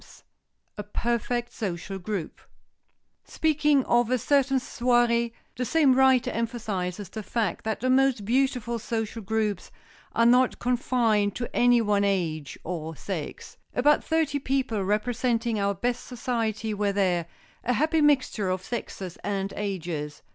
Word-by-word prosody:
[Sidenote: -, -, -18 dB, 0.6 s
A -, -, -2 dB
PERFECT 240 Hz, +3 st, -2 dB
SOCIAL 195 Hz, -1 st, -4 dB
GROUP] 190 Hz, -3 st, -5 dB, 0.8 s
Speaking 300 Hz, -3 st, +2 dB
of 240 Hz, -1 st, +3 dB
a 255 Hz, -, +2 dB
certain 270 Hz, +2 st, +2 dB
soirée, 240 Hz, -2 st, +2 dB, 0.2 s
the 250 Hz, -, -2 dB
same 285 Hz, 0 st, +4 dB
writer 260 Hz, -1 st, +4 dB
emphasizes 210 Hz, -5 st, -3 dB
the 220 Hz, -, -6 dB
fact 215 Hz, -3 st, -2 dB
that 220 Hz, -1 st, -2 dB
the 255 Hz, -, 0 dB
most 260 Hz, -5 st, +3 dB
beautiful 245 Hz, -1 st, 0 dB
social 225 Hz, 0 st, -3 dB
groups 210 Hz, -2 st, -1 dB, 0.5 s
are 230 Hz, -, +4 dB
not 250 Hz, +2 st, +4 dB
confined 235 Hz, -4 st, +1 dB
to 240 Hz, -, -5 dB
any 245 Hz, -1 st, +5 dB
one 205 Hz, -2 st, +2 dB
age 165 Hz, -7 st, -1 dB
or 160 Hz, -2 st, -5 dB
sex. 165 Hz, -3 st, -6 dB, 0.2 s
"About 295 Hz, +4 st, +4 dB
thirty 315 Hz, -3 st, 0 dB
people 260 Hz, -6 st, -1 dB
representing 230 Hz, +2 st, 0 dB
our 200 Hz, 0 st, +1 dB
best 245 Hz, +5 st, -2 dB
society 225 Hz, -3 st, -2 dB
were 205 Hz, 0 st, 0 dB
there, 180 Hz, -4 st, +1 dB, 0.4 s
a 245 Hz, -, +1 dB
happy 315 Hz, +5 st, +2 dB
mixture 265 Hz, -9 st, +2 dB
of 185 Hz, 0 st, -2 dB
sexes 190 Hz, -6 st, -5 dB
and 195 Hz, 0 st, -2 dB
ages. 170 Hz, -7 st, -4 dB
230 Hz, 140 wpm, -26 LUFS, 200-250 Hz, 0.8 s, any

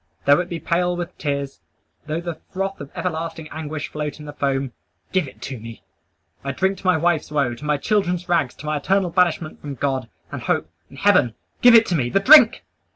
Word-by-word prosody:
Though 145 Hz, +2 st, +6 dB
it 180 Hz, 0 st, -3 dB
be 170 Hz, -, -4 dB
pale 175 Hz, +2 st, 0 dB
with 175 Hz, 0 st, -5 dB
tears; 140 Hz, -2 st, -3 dB, 0.5 s
though 160 Hz, +2 st, -2 dB
the 170 Hz, -2 st, -6 dB
froth 195 Hz, -1 st, -3 dB
of 140 Hz, -, -8 dB
everlasting 165 Hz, -2 st, -4 dB
anguish 155 Hz, -1 st, -5 dB
float 150 Hz, 0 st, -5 dB
in 150 Hz, -, -9 dB
the 145 Hz, -, -8 dB
foam 135 Hz, -2 st, -1 dB, 0.4 s
give 185 Hz, -6 st, +1 dB
it 110 Hz, -2 st, -13 dB
to 130 Hz, -2 st, -6 dB
me! 115 Hz, +1 st, -10 dB, 0.6 s
I 140 Hz, 0 st, -3 dB
drink 190 Hz, +6 st, 0 dB
to 185 Hz, -, -5 dB
my 180 Hz, -3 st, +4 dB
wife's 165 Hz, -1 st, +1 dB
woe; 140 Hz, -5 st, +1 dB
to 120 Hz, +5 st, -10 dB
my 150 Hz, -1 st, +1 dB
children's 180 Hz, 0 st, 0 dB
rags; 165 Hz, -8 st, +1 dB
to -, -, -11 dB
my 150 Hz, 0 st, -1 dB
eternal 185 Hz, +4 st, +1 dB
banishment 170 Hz, -3 st, 0 dB
from 145 Hz, -1 st, -6 dB
God, 130 Hz, -3 st, -2 dB, 0.2 s
and -, -, -5 dB
hope, 80 Hz, -, 0 dB, 0.2 s
and 135 Hz, -, -14 dB
heaven! 185 Hz, -, +3 dB, 0.3 s
Give 245 Hz, -1 st, +8 dB
it 225 Hz, 0 st, +7 dB
to 180 Hz, -, -1 dB
me! 125 Hz, -6 st, 0 dB
the 195 Hz, -, +2 dB
drink!" 265 Hz, +1 st, +7 dB
160 Hz, 215 wpm, -22 LUFS, 140-180 Hz, 0.6 s, Give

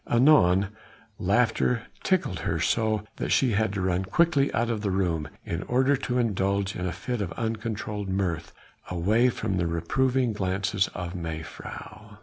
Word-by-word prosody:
Anon 100 Hz, -8 st, +5 dB, 0.5 s
laughter 115 Hz, +3 st, +2 dB, 0.2 s
tickled 180 Hz, -, 0 dB
her 80 Hz, -, -1 dB
so 110 Hz, +6 st, +1 dB
that -, -, -3 dB
she 130 Hz, -3 st, +3 dB
had 110 Hz, -1 st, +1 dB
to 100 Hz, -, -2 dB
run 90 Hz, 0 st, +1 dB
quickly 145 Hz, -, +2 dB
out 120 Hz, +1 st, 0 dB
of 110 Hz, -2 st, -2 dB
the 105 Hz, -, -1 dB
room, 85 Hz, -6 st, 0 dB, 0.2 s
in 85 Hz, +1 st, -3 dB
order 130 Hz, +5 st, +2 dB
to 125 Hz, -2 st, -2 dB
indulge 100 Hz, -4 st, 0 dB
in 90 Hz, 0 st, -2 dB
a -, -, -1 dB
fit 125 Hz, +2 st, -3 dB
of 90 Hz, -4 st, -3 dB
uncontrolled 110 Hz, -3 st, -3 dB
mirth, 90 Hz, -4 st, -1 dB, 0.4 s
away 105 Hz, +8 st, +3 dB
from 105 Hz, -5 st, -2 dB
the 85 Hz, -1 st, +1 dB
reproving 125 Hz, +8 st, +1 dB
glances 95 Hz, 0 st, 0 dB
of 90 Hz, -1 st, -4 dB
mevrouw. 90 Hz, +5 st, -7 dB
100 Hz, 155 wpm, -27 LUFS, 90-120 Hz, 0.5 s, Anon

